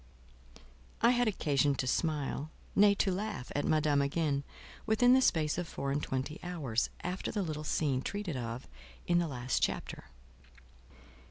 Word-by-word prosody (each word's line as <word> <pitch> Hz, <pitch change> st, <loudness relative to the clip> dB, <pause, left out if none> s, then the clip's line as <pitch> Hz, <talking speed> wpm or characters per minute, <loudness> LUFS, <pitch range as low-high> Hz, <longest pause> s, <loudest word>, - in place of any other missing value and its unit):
I 235 Hz, -, +7 dB
had 245 Hz, -1 st, +2 dB
occasion 145 Hz, -8 st, +2 dB
to 130 Hz, -, -2 dB
smile—nay, 155 Hz, +7 st, +1 dB
to 195 Hz, 0 st, +1 dB
laugh, 200 Hz, -7 st, -4 dB
at 145 Hz, -, 0 dB
Madame 150 Hz, -2 st, +3 dB
again, 140 Hz, 0 st, 0 dB, 0.4 s
within 245 Hz, +3 st, +5 dB
the 260 Hz, -, +6 dB
space 160 Hz, -8 st, +2 dB
of 175 Hz, -, -3 dB
four 140 Hz, -3 st, -3 dB
and 145 Hz, +2 st, 0 dB
twenty 135 Hz, +4 st, -3 dB
hours 145 Hz, -11 st, -1 dB
after 180 Hz, +1 st, -3 dB
the 205 Hz, -3 st, -1 dB
little 155 Hz, -3 st, -4 dB
scene 145 Hz, -4 st, 0 dB
treated 200 Hz, -1 st, -3 dB
of 120 Hz, 0 st, -5 dB, 0.4 s
in 175 Hz, 0 st, +3 dB
the 170 Hz, -, 0 dB
last 125 Hz, -3 st, -2 dB
chapter. -, -, -2 dB
155 Hz, 150 wpm, -32 LUFS, 140-190 Hz, 0.4 s, I